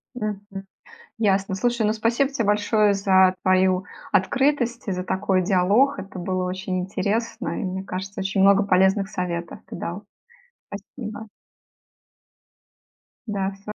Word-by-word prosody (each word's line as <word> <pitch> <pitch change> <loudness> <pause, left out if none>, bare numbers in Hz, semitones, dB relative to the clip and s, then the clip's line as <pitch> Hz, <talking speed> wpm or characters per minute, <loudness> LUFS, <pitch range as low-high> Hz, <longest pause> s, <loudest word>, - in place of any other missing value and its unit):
Мгм. 210 -4 -3 0.8
Ясно. 195 -3 +1
Слушай, 240 +1 0
ну 215 - +2
спасибо 235 +5 +1
тебе 235 -6 -2
большое 210 0 +3
за 190 -2 +4
твою 185 0 +3 0.3
открытость, 245 0 +1
за 180 - -3
такой 190 0 0
диалог. 200 +7 +3
Это 195 -1 -8
было 185 +1 -2
очень 185 0 -3
интересно, 200 +5 -2
и, - - -3
мне 190 0 -3
кажется, 195 +1 -6
очень 195 +1 0
много 200 +1 +6
полезных 190 +1 +3
советов 170 -3 -4
ты - - -8
дал. 175 +4 -5 0.7
Спасибо. 220 -4 -8 2.0
Да, 195 -2 -1
всё. 200 +2 -13
195 Hz, 125 wpm, -23 LUFS, 185-215 Hz, 2.0 s, много